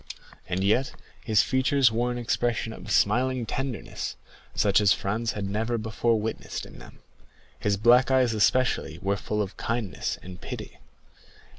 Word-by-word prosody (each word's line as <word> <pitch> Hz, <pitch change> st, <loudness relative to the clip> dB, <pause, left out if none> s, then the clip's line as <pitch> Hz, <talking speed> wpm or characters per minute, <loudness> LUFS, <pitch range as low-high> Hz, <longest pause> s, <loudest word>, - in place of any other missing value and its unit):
And 95 Hz, +2 st, -1 dB
yet 115 Hz, +7 st, +2 dB, 0.3 s
his 110 Hz, -3 st, +3 dB
features 130 Hz, -1 st, +3 dB
wore 120 Hz, +2 st, 0 dB
an 120 Hz, -, -3 dB
expression 120 Hz, -1 st, -1 dB
of -, -, -10 dB
smiling 125 Hz, +3 st, +2 dB
tenderness, 130 Hz, 0 st, -4 dB, 0.4 s
such 100 Hz, -1 st, +3 dB
as 100 Hz, -, +5 dB
Franz 115 Hz, +4 st, -2 dB
had 100 Hz, -2 st, -3 dB
never 110 Hz, +4 st, -1 dB
before 110 Hz, +1 st, 0 dB
witnessed 110 Hz, +1 st, -4 dB
in -, -, -13 dB
them; -, -, -14 dB, 0.6 s
his 100 Hz, +7 st, +1 dB
black 120 Hz, +4 st, +5 dB
eyes 130 Hz, -3 st, +3 dB
especially 110 Hz, -7 st, +1 dB
were 100 Hz, +1 st, +1 dB
full 105 Hz, +1 st, -2 dB
of 95 Hz, -, -8 dB
kindness 115 Hz, -4 st, -2 dB
and 90 Hz, 0 st, -10 dB
pity. -, -, -7 dB
115 Hz, 150 wpm, -26 LUFS, 105-120 Hz, 0.6 s, as